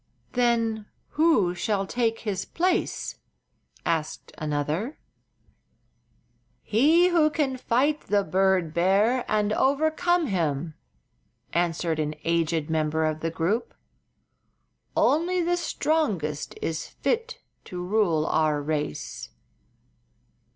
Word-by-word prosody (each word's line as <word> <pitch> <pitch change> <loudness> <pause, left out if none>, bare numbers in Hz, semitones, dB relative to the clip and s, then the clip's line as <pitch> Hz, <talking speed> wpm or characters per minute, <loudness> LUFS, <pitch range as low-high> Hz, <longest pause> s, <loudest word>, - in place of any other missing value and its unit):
"Then 230 -3 +1 0.2
who 310 - +3
shall 195 +2 -1
take 225 +1 -1
his 195 -4 -2
place?" 360 +2 -1 0.7
asked 160 -2 -2
another. 155 - -2 1.7
"He 315 +11 +4
who 325 -3 +4
can 290 -4 -1
fight 260 +5 0
the 205 0 +2
bird 185 -2 +1
bear 200 +9 +3
and 210 0 +2
overcome 315 +7 +2
him," 165 - -1 0.8
answered 170 -1 0
an 150 0 -1
aged 165 -2 0
member 160 0 0
of 155 0 -1
the 165 - -2
group. 175 +8 -1 1.2
"Only 350 +4 +2
the 350 +1 +1
strongest 210 - -1
is 160 -1 -2
fit 475 0 -2 0.3
to 180 -1 -6
rule 180 -6 +2
our 155 -2 +1
race." 145 - -4
195 Hz, 100 wpm, -26 LUFS, -, 1.7 s, He